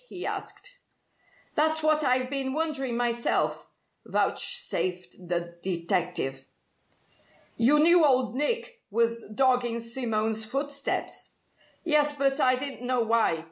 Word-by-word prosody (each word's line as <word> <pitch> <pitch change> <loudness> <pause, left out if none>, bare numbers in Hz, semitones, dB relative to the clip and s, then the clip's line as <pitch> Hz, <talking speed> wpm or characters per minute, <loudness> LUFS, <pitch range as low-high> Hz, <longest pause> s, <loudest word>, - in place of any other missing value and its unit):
he 365 - -6
asked. - - -5 0.7
"That's 315 +1 +1
what 310 0 +3
I've 255 -1 +2
been 270 -1 -2
wondering 280 -6 -1
myself," 240 -1 0 0.4
vouchsafed 180 0 -1
the 170 0 -3
detective. 170 -7 -2 1.1
"You 250 +6 +4
knew 335 +3 +6
Old 255 -4 +2
Nick 470 - -1
was 230 +2 +1
dogging 245 0 +1
Simone's 225 -2 -1
footsteps?" 275 +5 -3 0.5
"Yes, 300 -3 +3
but 275 0 0
I 255 -2 +4
didn't 270 0 -6
know 250 0 0
why. 225 -7 +2
255 Hz, 110 wpm, -27 LUFS, 220-290 Hz, 1.1 s, knew